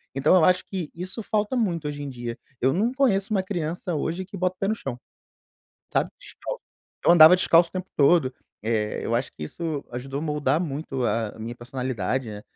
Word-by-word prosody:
Então 145 +6 +4
eu 170 -4 +6
acho 185 0 +4
que 185 -6 -4
isso 185 +6 -6
falta 210 +2 0
muito 175 -10 0
hoje 145 0 -4
em 145 - -4
dia. 120 -2 -5 0.2
Eu 130 - +4
não 220 +7 +1
conheço 220 -7 +2
uma 190 -2 +2
criança 175 -1 -3
hoje 170 +5 -2
que 195 - -10
bota 185 0 0
o - - -62
pé 195 - 0
no 220 - +1
chão, 135 - -6 0.9
sabe, - - +1
descalço. - - -7 0.5
Eu - - +7
andava 165 0 +10
descalço 170 -2 +4
o - - -33
tempo 185 0 -5
todo, 140 -2 +4 0.3
eh, 110 -1 -1
eu 115 - +1
acho 125 +2 -1
que 75 - -8
isso 155 - -4
ajudou 135 +3 -4
moldar 150 -2 +1
muito 140 -5 -3
a 115 -2 0
a - - -13
minha 115 +2 -5
personalidade, 125 -1 -3
né. 105 0 -7
155 Hz, 205 wpm, -25 LUFS, 130-185 Hz, 0.9 s, andava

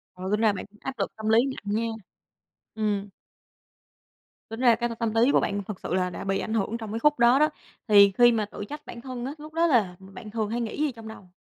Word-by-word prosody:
Ừ, 185 +1 -6
tính 210 - +2
ra 220 -2 +4
bạn 185 - -6
cũng 210 +1 -22
áp 270 - -4
lực - - -2
tâm 220 0 -3
lý 220 - +5
nặng 210 -6 -4
nha. 230 +1 0 0.9
Ừm. 205 -2 -1 1.4
Tính 225 +1 -6
ra 245 -2 +5
cái 240 +1 -2
tâm 230 - -6 0.2
tâm 225 +1 +4
lý 265 - +4
của - - +4
bạn 200 0 -2
thật 195 -1 -7
sự - - -3
là 180 0 +1
đã - - -7
bị 195 0 0
ảnh 220 - -4
hưởng 225 +1 -1
trong 220 -3 -7
cái 225 - -3
khúc 295 +2 +3
đó 240 +3 +5
đó. 305 +1 +4 0.4
Thì 200 -2 +7
khi 240 0 +7
mà 220 -2 0
tự 205 0 -8
trách 295 +1 -8
bản 235 - -9
thân 250 -1 -6
á, 270 - -3
lúc 305 +1 -11
đó 335 +1 +3
là 215 - +2
bạn 195 +3 -11
thường 215 -1 -2
hay 235 +2 -2
nghĩ 225 - -4
gì 305 -2 +1
trong 225 -2 -11
đầu? 210 -4 -11
225 Hz, 260 wpm, -26 LUFS, 205-240 Hz, 1.4 s, Thì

